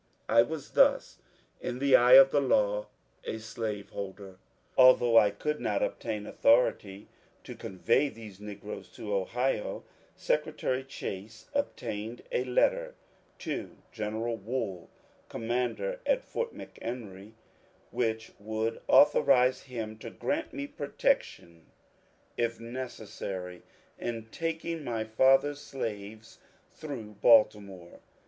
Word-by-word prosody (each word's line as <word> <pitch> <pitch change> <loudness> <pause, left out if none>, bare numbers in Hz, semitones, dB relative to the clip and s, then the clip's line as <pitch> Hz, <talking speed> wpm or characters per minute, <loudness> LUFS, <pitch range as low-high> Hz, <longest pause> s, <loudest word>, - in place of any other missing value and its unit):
I 115 +1 +6
was 150 +4 -4
thus, - - +3 0.4
in 125 - -4
the 135 0 +4
eye 125 0 +6
of 135 0 +9
the 145 - +3
law, 105 -5 +1 0.4
a - - -4
slaveholder! 100 -3 -6 0.4
Although 125 -2 +6
I 105 -2 +7
could 150 +9 -3
not 105 -1 0
obtain 105 -3 -3
authority 105 -4 +2 0.4
to - - -8
convey 115 +9 0
these 110 -6 -12
negroes 105 0 -8
to 105 -1 -5
Ohio, 115 +5 -1 0.3
Secretary 130 +1 -1
Chase 110 - -8
obtained 120 - -3
a 125 - +1
letter - - +1 0.5
to - - -4
General 110 +1 -3
Wool, 105 -5 -4 0.4
commander 125 - -2
at - - +2
Fort 475 -1 -3
McHenry, 110 -4 -8 0.6
which 110 -2 -2
would 110 +2 -3
authorize 130 -3 +5
him 110 -4 -6
to 115 - -7
grant 310 - -3
me 285 -1 -4
protection 290 - -2 0.7
if 115 -1 -1
necessary 110 -7 -6 0.4
in 115 -2 -5
taking 165 0 -3
^^my 115 -6 -3
father's 135 +5 +4
slaves 110 -4 -6 0.2
*' - - -36
through 115 -9 -7
Baltimore. 100 -6 +3
115 Hz, 110 wpm, -29 LUFS, 105-130 Hz, 0.7 s, of